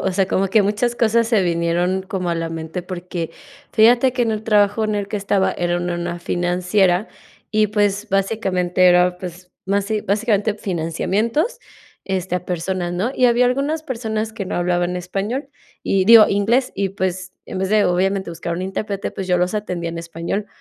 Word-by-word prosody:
o 190 - 0
sea, 190 +1 +1
como 195 +1 0
que 210 +2 +4
muchas 210 +4 0
cosas 230 0 +2
se 220 -5 +3
vinieron 175 +2 0
como 185 -2 -3
a - - 0
la 165 0 -2
mente, 165 +2 -5
porque 175 -2 -5 0.4
fíjate 240 +3 +4
que 250 - +1
en 225 - +1
el 215 0 -2
trabajo 210 0 +2
en 215 -1 -1
el 200 -1 -2
que 205 0 -3
estaba 200 -1 +1
era 175 0 -1
en 175 0 -2
una 175 0 -3
financiera 180 +3 +1 0.4
y, 215 -1 +3
pues, 205 0 0
básicamente 190 -3 +1
era, 180 0 +4
pues, 180 0 -9
basi 200 +2 0
básicamente 205 +1 0
financiamientos, 210 - -1 0.5
este, 185 -2 -2
a 180 0 -2
personas, 175 0 -2
¿no? 205 +8 -1
Y 255 - +4
había 240 +1 +4
algunas 280 +5 0
personas 220 -5 -3
que 200 -4 -5
no - - -4
hablaban 175 0 0
español 200 +10 -3 0.3
y 190 -1 +1
digo, 225 -2 +9
inglés 225 +6 +1
y, 195 -1 -1
pues, 185 -1 -3
en - - -6
vez 190 0 -1
de 210 0 +3
obviamente 190 +1 0
buscar 170 0 -4
un 180 - -4
intérprete, 195 +1 -3
pues, 190 - -6
yo 180 -1 +2
los 180 +1 0
atendía 180 -5 -3
en 165 - -6
español. 170 +5 -4
195 Hz, 185 wpm, -20 LUFS, 180-215 Hz, 0.5 s, digo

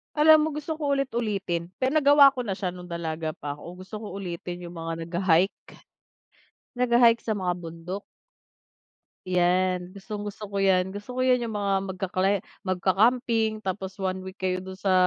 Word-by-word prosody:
Alam 305 0 +7
mo 315 - 0
gusto 300 +2 -4
ko 295 -2 -1
ulit-ulitin, 210 -10 -1
pero 260 +4 +1
nagawa 285 -2 +7
ko 250 - -2
na 205 - -3
siya 190 0 -2
nung 180 0 -6
dalaga 160 -2 -3
pa 145 -1 -6
ko, 175 +5 -11
gusto 190 +3 -9
ko 210 0 -6
ulitin 180 -2 -5
yung 175 - -10
mga 165 0 -5
nagha-hike. 180 +1 +1 1.1
Nagha-hike 235 -1 +4
sa 220 - 0
mga 185 -3 0
bundok. 175 +3 -7 1.2
'Yan, 180 0 +1
gustong-gusto 205 0 -6
ko 200 - -4
yan, 190 -1 +3
gusto 205 +6 -7
ko 255 - -1
yan, 250 -2 +3
yung 220 - -4
mga 200 -1 0
mag 190 -1 -6
ka 190 - -1
climb, 190 +1 +1 0.2
magka-camping, 220 +4 +2
tapos 190 -1 -4
1 190 0 -1
week 190 +1 -10
kayo 185 -1 0
dun 190 0 -7
sa 190 0 0
195 Hz, 170 wpm, -26 LUFS, 180-230 Hz, 1.2 s, Alam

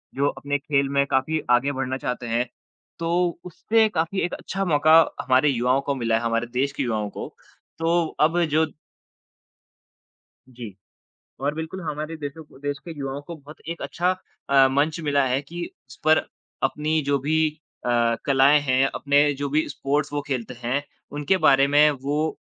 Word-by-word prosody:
जो 140 +1 +2
अपने 145 0 -2
खेल 140 -1 0
में 140 - +4
काफ़ी 150 +5 0
आगे 125 +3 +3
बढ़ना 130 -1 -2
चाहते 125 -2 -4
हैं 115 +2 0 0.5
तो 165 0 -2 0.4
उससे 220 +5 +2
काफ़ी 165 +4 0
एक 175 - -1
अच्छा 195 0 -4
मौका 155 -1 +4 0.3
हमारे 130 +3 +3
युवाओं 125 +1 +1
को 140 - +1
मिला 115 -3 0
है, 115 - -3
हमारे 115 0 0
देश 135 +2 +1
के 140 - -2
युवाओं 110 -4 -1
को। - - -7 0.5
तो 165 +1 +2
अब 165 +3 +3
जो 155 +1 +2 1.8
जी। 120 -6 -10 0.6
और 145 +2 -1
बिल्कुल 160 +4 -5
हमारे 155 0 -4
देशों 150 +1 -7 0.2
देश 145 0 -3
के 170 - -8
युवाओं 135 0 -4
को 170 - -6
बहुत 150 +1 -14
एक 170 - -5
अच्छा 180 +2 0 0.4
अ, 135 -1 +6
मंच 150 +4 0
मिला 145 -3 +2
है 130 +2 +1
कि 170 +4 -6 0.2
उस 130 - -13
पर 155 0 +6 0.4
अपनी 155 +1 +1
जो 140 0 +1
भी 155 +3 +1 0.4
अ, 120 -1 +2
कलाएँ 140 +2 +5
हैं, 135 -1 +2
अपने 145 +1 +3
जो 140 +1 -3
भी 155 +3 0
स्पोर्ट्स 145 +1 -1
वो 145 - -1
खेलते 125 -3 -3
हैं 130 +4 0 0.3
उनके 145 +6 +1
बारे 135 0 +6
में 150 +2 +5
वो 145 +3 -1
145 Hz, 170 wpm, -24 LUFS, 130-155 Hz, 1.8 s, अ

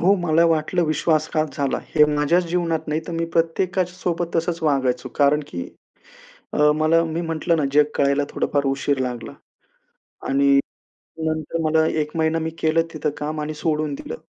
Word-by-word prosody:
हो, 190 +4 +5
मला 170 -2 +2
वाटलं, 165 +2 +1
विश्वासघात 155 0 +1
झाला, 140 -2 0 0.2
हे 150 -1 +7
माझ्याच 150 +5 +2
जीवनात 165 -2 -1
नाही, 155 +1 0
तर 170 - -5
मी 165 0 -1
प्रत्येकाच्या 180 +2 0
सोबत 175 -1 -2
तसंच 165 +1 -1
वागायचो, 130 -4 0
कारण 145 +1 +4
की 85 0 -6 0.9
अ, 150 0 +4
मला 155 +2 +3
मी 165 0 -3
म्हंटलं 165 0 0
ना, 150 - 0
जग 150 +1 +6
कळायला 140 +1 +2
थोडा-फार 145 -1 -1
उशीर 135 +1 0
लागला. 125 -2 -4 1.0
आणि 140 0 +4 0.7
नंतर 155 +1 -2
मला, 160 0 +3
1 150 -1 -1
महिना 160 0 +1
मी 160 0 -2
केलं 160 +1 +2
तिथं 150 -1 -1
काम 150 +1 -3
आणि 150 +1 -4
सोडून 150 -1 -1
दिलं. 80 - -7
155 Hz, 165 wpm, -22 LUFS, 145-165 Hz, 1.0 s, हे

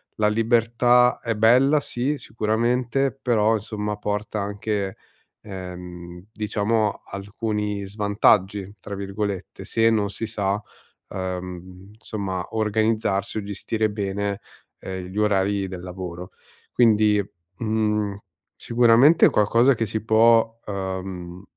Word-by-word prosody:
la 105 - +2
libertà 120 +2 +3
è 115 -2 -2
bella, 130 +7 +5
sì, 140 +2 -2
sicuramente, 120 +5 0
però 115 -2 +2
insomma 105 0 -3
porta 105 0 -3
anche, 100 -1 -3 0.4
ehm, 90 -2 -9
diciamo 105 0 -1
alcuni 105 0 -3
"svantaggi", 100 -1 +1
tra 100 - -6
virgolette, 100 -1 -4
se 115 +3 +2
non 105 -3 +1
si 115 - -4
sa, 105 -1 -1 0.5
ehm, 90 0 -6
insomma 100 -4 -4
organizzarsi 110 -2 0
o 105 - -2
gestire 110 +2 -2
bene, 100 -1 -3 0.4
ehm, 95 -1 -6
gli 95 +3 -9
orari 100 -1 +1
del 90 -1 -7
lavoro. 90 -1 -7 0.4
Quindi, 105 -3 +4 0.4
mhmm, 105 -2 0 0.4
sicuramente 120 +6 +5
qualcosa 115 +6 +4
che 115 -1 -1
si 110 +1 -4
può, 115 +1 +4
uhm, 95 -2 -5
105 Hz, 110 wpm, -23 LUFS, 95-115 Hz, 0.5 s, bella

